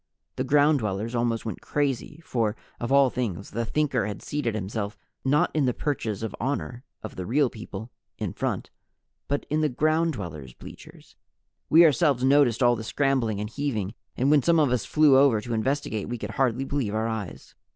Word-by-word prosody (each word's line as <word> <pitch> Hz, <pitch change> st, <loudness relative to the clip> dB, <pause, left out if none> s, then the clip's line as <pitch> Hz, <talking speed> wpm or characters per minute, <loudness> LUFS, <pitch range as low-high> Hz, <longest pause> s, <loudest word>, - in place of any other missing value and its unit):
The 130 Hz, -, -1 dB
Ground 145 Hz, +2 st, +4 dB
Dwellers 105 Hz, +1 st, -3 dB
almost 120 Hz, -1 st, 0 dB
went 110 Hz, -, -5 dB
crazy 145 Hz, +2 st, -2 dB
for, 115 Hz, -3 st, 0 dB, 0.2 s
of 120 Hz, +2 st, -3 dB
all 140 Hz, -2 st, +5 dB
things, 100 Hz, -6 st, -3 dB
the 115 Hz, +2 st, -2 dB
Thinker 135 Hz, -5 st, 0 dB
had 105 Hz, -1 st, -6 dB
seated 130 Hz, -7 st, -2 dB
himself 105 Hz, +1 st, -4 dB, 0.3 s
not 145 Hz, +3 st, +2 dB
in 150 Hz, -3 st, +2 dB
the 125 Hz, -, 0 dB
perches 115 Hz, -8 st, -2 dB
of 110 Hz, -, -4 dB
honor 125 Hz, -1 st, -3 dB, 0.2 s
of 110 Hz, -, -8 dB
the 90 Hz, -, -4 dB
Real 135 Hz, +2 st, +2 dB
People, 110 Hz, 0 st, -8 dB, 0.3 s
in -, -, -3 dB
front, -, -, -3 dB, 0.6 s
but 145 Hz, 0 st, -1 dB
in 155 Hz, +1 st, +2 dB
the 155 Hz, -, +2 dB
Ground 155 Hz, +5 st, +1 dB
Dwellers' 75 Hz, -, -7 dB
bleachers. -, -, -13 dB, 0.5 s
We 165 Hz, +2 st, +8 dB
ourselves 145 Hz, -4 st, +3 dB
noticed 135 Hz, -3 st, +4 dB
all 120 Hz, 0 st, +5 dB
the 110 Hz, -, -6 dB
scrambling 125 Hz, -4 st, 0 dB
and 105 Hz, -, -3 dB
heaving, 110 Hz, -5 st, -3 dB, 0.2 s
and 135 Hz, +3 st, +2 dB
when 150 Hz, -2 st, +5 dB
some 165 Hz, +3 st, +3 dB
of 145 Hz, -5 st, +3 dB
us 125 Hz, -4 st, 0 dB
flew 150 Hz, -3 st, +5 dB
over 135 Hz, -6 st, +4 dB
to 120 Hz, +2 st, -5 dB
investigate 110 Hz, -2 st, -1 dB
we 120 Hz, -, -3 dB
could 105 Hz, -1 st, -5 dB
hardly 130 Hz, +1 st, 0 dB
believe 130 Hz, -7 st, -2 dB
our 110 Hz, +1 st, 0 dB
eyes. 110 Hz, -5 st, -6 dB
125 Hz, 190 wpm, -26 LUFS, 110-145 Hz, 0.6 s, We